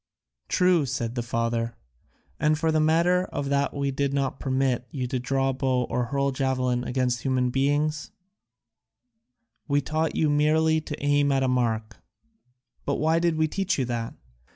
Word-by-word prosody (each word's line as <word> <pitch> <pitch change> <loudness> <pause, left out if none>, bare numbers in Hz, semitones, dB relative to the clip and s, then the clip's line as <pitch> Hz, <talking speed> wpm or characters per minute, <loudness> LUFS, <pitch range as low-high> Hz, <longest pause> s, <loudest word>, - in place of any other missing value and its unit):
"True," 180 -5 +3
said 120 -2 -3
the 120 - -2
father, 115 0 -2 0.6
"and 155 0 +2
for 160 +1 +1
the 155 - +2
matter 170 +4 +3
of 145 -5 -4
that 140 0 +1
we 140 -1 -1
did 140 +1 -1
not 135 -1 -1
permit 130 -2 0
you 130 -4 -3
to 125 +1 -2
draw 135 +1 0
bow 130 -1 0
or 125 0 0
hurl 140 +3 0
javelin 130 -2 0
against 125 -2 -1
human 130 -2 0
beings; 145 +3 0 1.6
we 145 -1 +2
taught 155 +3 -1
you 155 - +2
merely 155 +2 +3
to 150 -1 -6
aim 145 0 +3
at 135 -1 +2
a - - +2
mark. 115 -4 -1 0.9
But 140 - -1
why 160 +2 +2
did 170 -1 +1
we 155 0 +2
teach 195 +4 -1
you 135 - 0
that? 115 -1 -4
135 Hz, 165 wpm, -25 LUFS, 125-155 Hz, 1.6 s, True